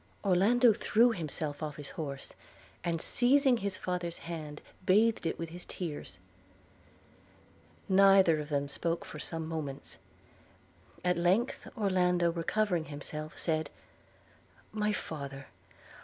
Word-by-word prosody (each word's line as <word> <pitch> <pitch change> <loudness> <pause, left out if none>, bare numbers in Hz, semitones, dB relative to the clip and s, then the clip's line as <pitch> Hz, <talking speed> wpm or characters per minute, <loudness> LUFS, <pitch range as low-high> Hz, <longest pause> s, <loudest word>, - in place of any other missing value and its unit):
Orlando 215 +5 +5
threw 235 +4 +3
himself 155 -6 -3
off 150 -2 -4
his 145 -2 -8
horse, 140 -5 -6 0.5
and, 170 -1 -1
seizing 260 - +3
his 200 -3 -1
father's 175 -2 -3
hand, 155 -3 -6 0.2
bathed 215 0 +3
it - - -2
with 165 -1 -5
his 175 +2 -8
tears. 150 - -6 1.7
Neither 190 -4 +6
of 150 0 -6
them 145 -1 0
spoke 165 +4 -2
for 150 - -9
some 160 +1 -3
moments. 150 -4 -6 1.1
At 180 -1 +2
length 190 +9 +1
Orlando, 180 -4 +2
recovering 175 +1 0
himself, 150 +1 -7
said: 155 -1 -1 1.0
'My 210 0 +1
father! 140 -8 -5
170 Hz, 115 wpm, -31 LUFS, 155-195 Hz, 1.7 s, Neither